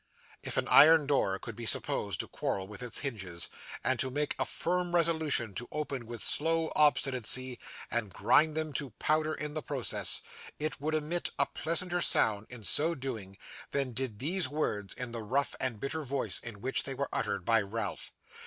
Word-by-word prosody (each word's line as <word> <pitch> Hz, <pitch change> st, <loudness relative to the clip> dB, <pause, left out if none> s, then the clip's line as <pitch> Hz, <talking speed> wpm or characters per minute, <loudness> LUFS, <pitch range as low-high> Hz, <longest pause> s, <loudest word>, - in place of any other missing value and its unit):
If -, -, -3 dB
an -, -, +1 dB
iron 160 Hz, -1 st, +7 dB
door 135 Hz, -9 st, +1 dB
could 115 Hz, +2 st, -8 dB
be 115 Hz, 0 st, -4 dB
supposed 100 Hz, -5 st, 0 dB
to -, -, -7 dB
quarrel 95 Hz, -1 st, -3 dB
with 105 Hz, +2 st, -10 dB
its 120 Hz, -2 st, -4 dB
hinges, 95 Hz, -11 st, -4 dB, 0.3 s
and 130 Hz, 0 st, +1 dB
to 130 Hz, -, +1 dB
make 145 Hz, +3 st, -1 dB
a -, -, +1 dB
firm 175 Hz, 0 st, 0 dB
resolution 160 Hz, -, +3 dB
to 120 Hz, +5 st, -4 dB
open 140 Hz, -6 st, -4 dB
with 120 Hz, -1 st, -4 dB
slow 165 Hz, +1 st, +3 dB
obstinacy, 130 Hz, -4 st, +2 dB, 0.3 s
and 110 Hz, -4 st, -1 dB
grind 155 Hz, +9 st, +3 dB
them 155 Hz, -2 st, -2 dB
to 140 Hz, -2 st, -2 dB
powder 155 Hz, 0 st, +1 dB
in 150 Hz, -1 st, -4 dB
the 155 Hz, -, -3 dB
process, 135 Hz, -5 st, +1 dB, 0.3 s
it 155 Hz, -2 st, -2 dB
would 155 Hz, +2 st, 0 dB
emit 155 Hz, +3 st, 0 dB
a -, -, +3 dB
pleasanter 175 Hz, +2 st, -1 dB
sound 105 Hz, -7 st, +4 dB
in 120 Hz, -3 st, -10 dB
so 160 Hz, +9 st, +3 dB
doing, 110 Hz, -9 st, -6 dB, 0.3 s
than 140 Hz, -2 st, -1 dB
did 120 Hz, -3 st, -3 dB
these 160 Hz, -, +1 dB
words 105 Hz, -9 st, -2 dB
in 125 Hz, -2 st, -5 dB
the 115 Hz, -1 st, -5 dB
rough 130 Hz, +7 st, 0 dB
and 120 Hz, -5 st, -2 dB
bitter 150 Hz, +6 st, -3 dB
voice 140 Hz, -2 st, 0 dB
in 110 Hz, -4 st, -9 dB
which 130 Hz, +3 st, +1 dB
they 135 Hz, -, -5 dB
were 140 Hz, +2 st, -3 dB
uttered 100 Hz, -3 st, -2 dB
by 115 Hz, -1 st, +4 dB
Ralph. 105 Hz, +1 st, -4 dB
135 Hz, 185 wpm, -31 LUFS, 115-155 Hz, 0.3 s, iron